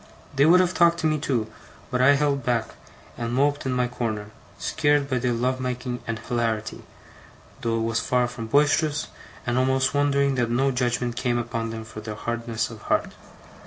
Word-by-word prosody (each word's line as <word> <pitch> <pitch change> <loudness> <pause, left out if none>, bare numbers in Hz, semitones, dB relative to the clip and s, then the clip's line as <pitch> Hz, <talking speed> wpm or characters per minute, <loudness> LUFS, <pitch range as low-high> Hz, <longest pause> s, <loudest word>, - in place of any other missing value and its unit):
They 140 +2 +5
would 180 +3 +7
have 185 0 +1
talked 170 -1 +4
to - - -1
me 155 -1 +2
too, 125 -6 0 0.5
but 125 -1 +1
I 140 +3 +6
held 140 -2 +1
back, 115 -2 0 0.5
and 115 0 -2
moped 145 +1 +1
in - - 0
my 125 -1 +1
corner; 110 -4 -4 0.3
scared 145 -2 +1
by 130 -2 0
their 125 0 0
love 125 +2 0
making 125 -1 -3
and 115 -1 -2
hilarity, 115 -1 -2 0.8
though 115 -1 0
it - - -1
was 115 0 0
far 125 -1 +1
from 120 -2 -7
boisterous, 145 +3 +2 0.4
and 120 +1 +1
almost 130 0 +2
wondering 140 -1 +2
that 120 - 0
no 135 +3 +2
judgement 125 -1 -1
came 120 -1 0
upon 115 -1 -3
them 110 0 -6
for 110 -1 -9
their 105 0 -6
hardness 115 +1 -3
of 110 -2 -10
heart. - - +1
125 Hz, 190 wpm, -25 LUFS, 115-140 Hz, 0.8 s, would